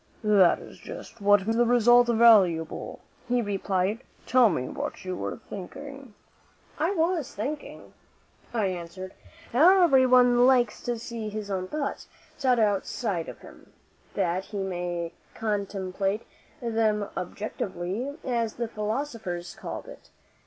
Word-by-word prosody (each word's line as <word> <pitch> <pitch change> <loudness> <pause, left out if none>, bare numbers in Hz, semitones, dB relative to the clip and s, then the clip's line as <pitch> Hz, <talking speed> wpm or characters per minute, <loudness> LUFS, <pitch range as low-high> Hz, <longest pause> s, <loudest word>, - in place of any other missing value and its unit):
"That 200 -5 +5
is - - -13
just 230 - -10
what 205 -1 +4
makes 225 +1 0
the 240 - +5
result 240 0 +5
valuable," 210 -9 +4 0.3
he 245 0 +2
replied. 200 -1 -1 0.3
"Tell 255 -3 +5
me 145 -8 -2
what - - -5
you 185 0 -3
were - - -4
thinking." 270 +5 -9 0.6
"I 320 +3 +2
was 325 -4 0
thinking," 285 +9 -6 0.6
I 225 -4 0
answered, 185 +1 -5 0.4
"how 355 +9 +6
everyone 250 -4 +5
likes 245 -4 +3
to 240 -1 -1
see 225 -1 -5
his 210 -1 -5
own 185 -1 -2
thoughts 290 +5 -4 0.3
set 255 -2 +2
outside 205 -3 0
of - - -11
him, - - -15 0.4
that 185 -1 0
he 210 - -7
may 175 -2 -3 0.2
contemplate 200 -1 -2 0.4
them 220 -3 +1
objectively, 205 - -4
as 235 -3 -1
the 235 0 -2
philosophers 215 -5 -4
call - - -7
it. - - -13
215 Hz, 130 wpm, -27 LUFS, 190-245 Hz, 0.6 s, how